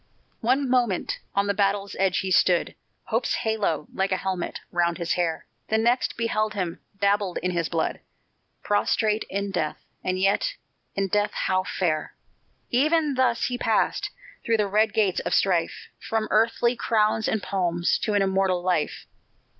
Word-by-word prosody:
One 260 +4 +1
moment 245 -7 +1 0.2
on 200 0 +2
the 200 - +1
battle's 200 0 0
edge 190 -1 +2
he 190 - -3
stood 180 -1 +3 0.3
Hope's 230 +3 0
halo, 215 - -1
like 195 +1 0
a 185 - +2
helmet, 185 -1 -3
round 170 -1 +1
his 170 -2 -1
hair; 170 -2 -1 0.2
The 220 - +2
next 235 +3 +1
beheld 215 -2 0
him, 180 -4 -3 0.2
dabbled 200 -2 +1
in 180 - +1
his 170 -3 -1
blood, 165 -2 -1 0.6
Prostrate 215 +1 +1
in 200 0 -2
death 155 -5 -1 0.3
and 185 0 -1
yet, 200 - +1 0.4
in 195 0 0
death 205 +2 +1
how 185 0 +1
fair! 155 -6 -1 0.6
Even 300 +3 +2
thus 255 -3 +2
he 245 -1 -2
passed - - +1 0.3
through 230 -1 +2
the 210 - +2
red 210 +2 +2
gates 200 -4 +1
of - - -1
strife, 175 -4 0
From 220 -1 -2
earthly 230 +2 +3
crowns 220 -1 +1
and 220 - -1
palms, 175 -2 0
to 215 - -1
an 200 - +4
immortal 190 -2 +1
life. 180 -5 -1
200 Hz, 160 wpm, -25 LUFS, 185-220 Hz, 0.6 s, an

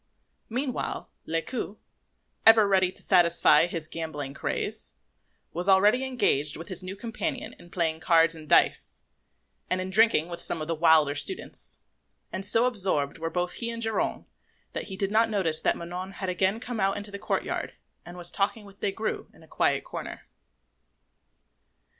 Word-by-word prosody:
Meanwhile, 255 +2 -3 0.2
Lescaut, 200 +6 -3 0.7
ever 225 -2 +7
ready 190 -2 +3
to - - -10
satisfy 170 -3 +4
his 165 -3 -5
gambling 150 -4 -5
craze, - - -4 0.6
was 180 +3 -1
already 205 +7 +5
engaged 150 - +1
with 165 +5 -9
his 185 -1 -1
new 185 +1 -6
companion 265 +7 -4
in 175 - -15
playing 165 -2 -1
cards 165 0 +4
and 155 -2 -7
dice, - - +2 0.7
and 185 - 0
in 185 0 -4
drinking 215 -6 +4
with 170 -1 -5
some - - 0
of 155 - -5
the 165 - 0
wilder 160 -3 +4
students; 375 - -2 0.6
and 190 - -4
so 225 +3 +4
absorbed 185 - +1
were 165 0 -2
both 180 +1 -2
he 235 - -3
and 230 0 -3
Geronte, 225 0 -1 0.5
that - - -4
they 190 - -6
did 195 +1 -1
not 225 +1 +3
notice 170 -7 +2
that - - +1
Manon 180 +3 -6
had 190 +1 -4
again 190 +4 +1
come 245 -2 -5
out 195 0 +1
into 205 0 -6
the 200 - -7
courtyard - - -2 0.3
and 175 +1 -11
was 175 -1 +2
talking 205 +2 -1
with 200 0 -16
Des 200 - -1
Grieux 220 +1 -3
in - - -18
a - - -18
quiet - - +1
corner. - - -7
185 Hz, 170 wpm, -27 LUFS, 165-215 Hz, 0.7 s, ever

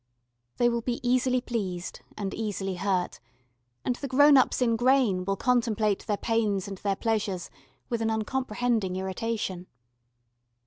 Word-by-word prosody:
They 240 - +4
will 235 -1 0
be 240 +1 -2
easily 255 0 +2
pleased 190 -8 -4 0.2
and 200 -2 -3
easily 205 -3 -3
hurt, 185 -1 -1 0.7
and 250 -1 0
the 280 - -4
grown 285 +3 +6
ups 260 - +4
in 235 -3 +2
grain 240 -6 +3
will 195 +1 0
contemplate 220 -3 +1
their 205 - 0
pains 210 -5 0
and 195 -2 -7
their 200 -1 0
pleasures 210 -4 -2 0.4
with 235 -1 -2
an 225 - +1
uncomprehending 220 -3 -1
irritation. 190 -1 -3
220 Hz, 140 wpm, -27 LUFS, 195-245 Hz, 0.7 s, grown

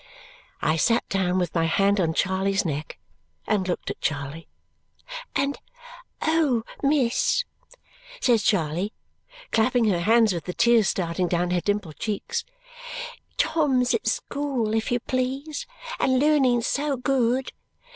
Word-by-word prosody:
I 155 +1 +2
sat 230 +7 +2
down 185 -2 +1
with 180 -1 -1
my 165 -1 +2
hand 195 +5 +2
on 160 -3 +1
Charley's 195 +2 +1
neck 150 - -4 0.5
and 190 -3 0
looked 180 - -2
at - - -9
Charley. 145 +2 -3 0.9
"And 280 +1 0 0.6
oh, 310 -8 +2 0.2
miss," 280 - +2 0.7
says 240 - +3
Charley, 185 0 0 0.6
clapping 235 +1 +3
her 180 -4 +1
hands, 220 +3 +4
with 170 - -5
the 180 - -5
tears 235 -3 +4
starting 175 0 -1
down 175 0 0
her 180 -1 +1
dimpled 205 -6 -2
cheeks, 345 - -2 0.9
"Tom's 265 -6 +2
at - - -1
school, 265 -7 -1
if 220 +1 0
you 245 - +2
please, 265 +5 -3 0.3
and 260 -1 +3
learning 270 -5 +3
so 285 +2 0
good! 255 0 +1
225 Hz, 130 wpm, -25 LUFS, 180-260 Hz, 0.9 s, hands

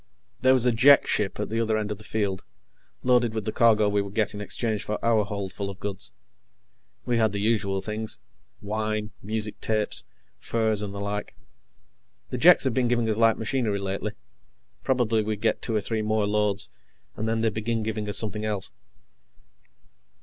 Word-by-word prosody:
There 130 0 +6
was 125 -1 +1
a 125 - +5
Jek 135 +5 +6
ship 105 -1 0
at 105 - -2
the 115 +1 -1
other 110 -1 +1
end 105 -1 -2
of 105 - -4
the - - -11
field, 100 -3 -2 0.6
loaded 120 -3 +3
with 110 -3 -2
the 110 - -1
cargo 110 -3 +4
we 105 0 +2
would 100 0 -7
get 110 -2 +1
in 105 - -6
exchange 110 +1 -2
for 105 - -2
our 115 -2 +4
holdful 100 0 -4
of 100 0 -9
goods. 100 -7 -5 0.9
We 120 -1 +1
had 110 -2 +2
the 100 - -2
usual 100 -3 +1
things; 110 +1 -4 0.5
wine, 110 0 -2
music 110 -1 -3
tapes, 110 -1 -1 0.4
furs, 110 -2 0
and 105 -1 -4
the 100 - -6
like. 100 +1 -4 1.0
The 125 - -2
Jeks 175 +6 +7
had 130 -3 +1
been 125 0 +2
giving 120 -1 +1
us 110 -1 +1
light 115 -1 +5
machinery 110 -3 -1
lately 100 0 -3 0.7
probably 120 -4 +2
we'd 105 -1 -2
get 110 0 +1
two 115 - -1
or 105 - +2
three 110 +2 -2
more 110 0 +1
loads, 105 -1 0 0.4
and 110 +1 -2
then 115 0 0
they'd 110 -2 +1
begin 110 +1 -1
giving 110 -1 -3
us 105 - -1
something 105 -1 -2
else. 105 -2 -2
110 Hz, 185 wpm, -26 LUFS, 105-115 Hz, 1.0 s, Jeks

